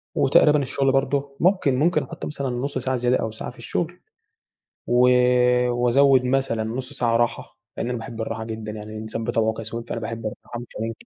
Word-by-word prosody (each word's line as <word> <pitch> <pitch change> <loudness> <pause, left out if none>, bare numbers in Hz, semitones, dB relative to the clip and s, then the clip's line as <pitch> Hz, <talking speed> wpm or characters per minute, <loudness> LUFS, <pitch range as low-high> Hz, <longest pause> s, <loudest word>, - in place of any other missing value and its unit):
وتقريبًا 145 +2 +4
الشغل 135 0 +1
برضو 140 +1 0
ممكن 180 -7 +3
ممكن 170 +5 +2
أحط 170 - -8
مثلًا 140 -3 -3
نص 130 +3 -3
ساعة 130 +1 -1
زيادة 125 0 +2
أو 110 - -3
ساعة 110 - -6
في - - -20
الشغل. - - -3 0.9
و 125 +1 +5 0.6
وأزود 125 +2 +4
مثلًا 125 -4 0
نص 125 +5 -5
ساعة 120 -4 +1
راحة، 120 0 -2 0.2
لأن 120 - -2
أنا 125 - -2
باحب 115 0 -7
الراحة 110 0 -4
جدًا، 110 -1 -6
يعني 105 0 -8
الإنسان 110 +1 -5
بطبعه 110 -1 +1
كسول، 115 +1 -6
فأنا - - -3
باحب 115 0 -5
الراحة 120 +2 -6
مش 120 - -9
هننكر. 115 +1 -5
120 Hz, 185 wpm, -23 LUFS, 115-135 Hz, 0.9 s, و